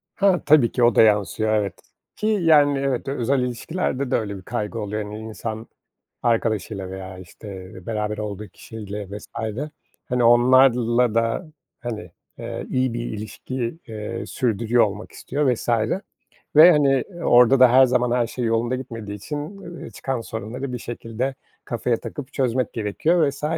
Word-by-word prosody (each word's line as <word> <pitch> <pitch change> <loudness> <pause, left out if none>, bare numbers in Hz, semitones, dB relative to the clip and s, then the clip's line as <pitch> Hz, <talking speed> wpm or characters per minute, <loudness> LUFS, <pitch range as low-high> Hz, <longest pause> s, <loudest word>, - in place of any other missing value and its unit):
Ha, 195 -4 +3
tabii 145 -6 +5
ki, 125 - 0
o 120 -2 +5
da - - +7
yansıyor 110 0 +2
evet, 100 -4 -1 0.3
ki, 215 - -2
yani, 160 -9 +4
evet, 135 -2 -1
özel 135 0 0
ilişkilerde 130 +2 -2
de - - +3
öyle 100 -3 -2
bir - - -10
kaygı 110 +2 -4
oluyor. 105 0 -3
Hani, 105 +1 -7
insan 110 0 -6 0.6
arkadaşıyla 110 -4 0
veya, 95 0 -7
işte, 95 +1 -10 0.2
beraber 105 -1 -2
olduğu 105 -1 -5
kişiyle 105 -2 -8
vs. - - -14 0.8
Hani, 125 -1 +2
onlarla 120 -1 +5
da, 115 +8 0 0.3
hani, 110 -7 -6 0.3
eee, - - -5
iyi 130 -2 0
bir 120 - -2
ilişki, 120 +4 -5
eee, 110 +1 -5
sürdürüyor 120 -1 +2
olmak 105 0 -5
istiyor 140 -2 0
vs. 115 - -9 0.9
ve, 160 +4 +10
hani, 140 -4 +3 0.2
orada 125 +2 +6
da 130 -2 +7
her 130 +1 +7
zaman 125 -1 +1
her 120 -1 +2
şey 125 +1 -3
yolunda 115 +2 +1
gitmediği 115 -5 -6
için, 145 +9 -5 0.2
ııı, 170 0 -9
çıkan 130 -3 -3
sorunları 115 +5 -5
bir - - -2
şekilde 120 +3 -4 0.3
kafaya 120 0 -1
takıp 140 -1 -8
çözmek 130 -1 0
gerekiyor 145 - +1
vs. 140 +1 -10
120 Hz, 155 wpm, -23 LUFS, 110-130 Hz, 0.9 s, ve